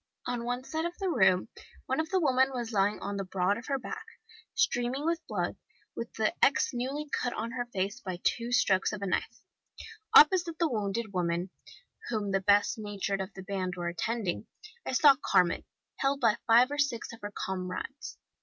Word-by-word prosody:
On 240 -1 -3
one 245 +1 -2
side 320 +4 -3
of 345 +1 -4
the 385 -2 -1
room 190 - +3 0.4
one 265 +2 -1
of 315 0 -1
the 380 - +2
women 265 -4 +3
was 240 -3 -4
lying 205 +1 +2
on 200 0 -3
the 195 - -2
broad 185 +1 0
of 240 - -12
her 275 - 0
back, 440 - -6 0.5
streaming 245 +4 +1
with 335 0 0
blood, - - -2 0.4
with 235 - -4
an 215 - +3
X 275 - +4
newly 270 +5 -3
cut 245 -3 -1
on 230 +1 -4
her 245 -1 -3
face 200 +1 -2
by 185 -7 -5
two 235 0 0
strokes 195 -6 +3
of 205 -1 -5
a - - -1
knife. 185 - -2 0.7
Opposite 335 +1 +7
the 335 - +2
wounded 215 0 -2
woman, 175 0 -1 0.6
whom 210 -4 -1
the 195 0 +1
best 205 +3 +3
natured 200 -2 -2
of 190 +2 -5
the 190 - -8
band 185 -1 -3
were 175 -1 -2
attending, 200 +2 -2 0.4
I - - -2
saw 285 +2 +7
Carmen, 180 -1 +2 0.3
held 275 0 +1
by 230 -3 +3
five 240 +4 +6
or 290 - -3
six 240 -5 -1
of 230 - -12
her 205 0 -5
comrades. 190 +8 -5
230 Hz, 190 wpm, -30 LUFS, 195-265 Hz, 0.7 s, Opposite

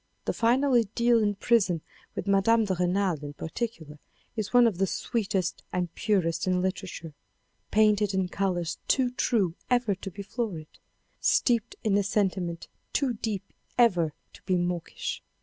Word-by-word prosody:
The - - 0
final 255 +4 +2
idyll 235 +1 +3
in 205 -1 +1
prison 195 -6 +2 0.3
with - - -3
Mme. 200 +3 +4
de 195 - 0
Renal, 180 -3 0
in 145 0 -6
particular, 160 -3 -5 0.4
is 215 -3 -3
one 245 -1 +6
of 205 -6 +1
the 195 - +3
sweetest 195 -5 -1
and 175 -2 -2
purest 180 -6 0
in 185 -1 +2
literature, 185 -4 -4 0.6
painted 210 -1 +3
in 190 -1 +1
colours 180 -3 -1
too 255 -2 +2
true 210 -8 +1 0.2
ever 245 -4 +2
to 195 +1 -7
be 200 +2 -8
florid, 195 -8 -5 0.4
steeped 235 -4 +2
in 210 -3 +2
a - - +1
sentiment 190 -4 -1 0.3
too 270 -4 +1
deep 215 -3 -3 0.3
ever 180 -10 +4 0.2
to - - -15
be 185 - +3
mawkish. 175 -1 -3
195 Hz, 150 wpm, -28 LUFS, 180-230 Hz, 0.6 s, one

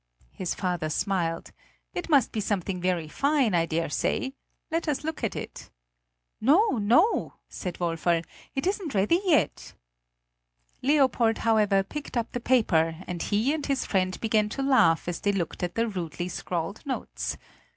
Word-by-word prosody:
His 185 - -3
father 175 -5 -1
smiled. 165 0 -1 0.4
"It 355 - -4
must 280 -7 +4
be 220 - -2
something 195 -3 -2
very 180 -3 0
fine, 275 - +1
I 165 -1 +2
dare 165 -1 -1
say; 265 - -1 0.4
let 330 +1 -1
us 295 -2 -1
look 315 -3 -4
at 225 - -1
it." - - -7 0.7
"No, 310 - +4
no," 250 - +3
said 180 -3 -5
Woferl, 170 -1 0 0.3
"it 270 - -1
isn't 375 - -1
ready 210 - +3
yet." 300 - +1 1.1
Leopold 260 -5 +3
however 210 -3 +4
picked 280 +5 -6
up 235 -1 -1
the 245 - -3
paper, 175 -10 +2
and 175 -2 -5
he 220 +8 +1
and 315 -2 -3
his 275 -2 0
friend 185 -2 0
began 215 -2 +1
to 270 +5 -3
laugh 175 -14 +4
as 175 -1 -2
they 205 - +1
looked 180 -4 -3
at 175 -1 -2
the 230 +1 +1
rudely 175 -3 -4
scrawled 175 +2 -4
notes. 210 - -4
210 Hz, 160 wpm, -27 LUFS, 175-270 Hz, 1.1 s, must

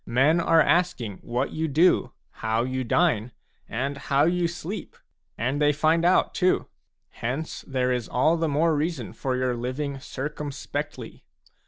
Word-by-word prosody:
Men 135 +8 +3
are 165 -1 +5
asking 155 - +1
what 125 +3 -2
you 160 +1 -1
do, 160 +5 +3 0.3
how 110 +1 +1
you 130 +1 -2
dine, 120 -4 +1 0.4
and 135 +5 -2
how 140 0 +1
you 175 +1 +2
sleep, 175 +4 -6 0.4
and 130 +6 -1
they 145 0 +5
find 160 +3 +2
out, 180 +2 +3
too; 185 0 +2 0.4
hence 130 +7 -4
there 130 -2 0
is 125 -3 -2
all 155 +7 +3
the 165 -1 0
more 155 +3 +2
reason 150 -5 -2
for 130 -1 -2
your 125 -1 0
living 135 +4 -3
circumspectly. 145 +1 -5
140 Hz, 150 wpm, -25 LUFS, 125-165 Hz, 0.4 s, are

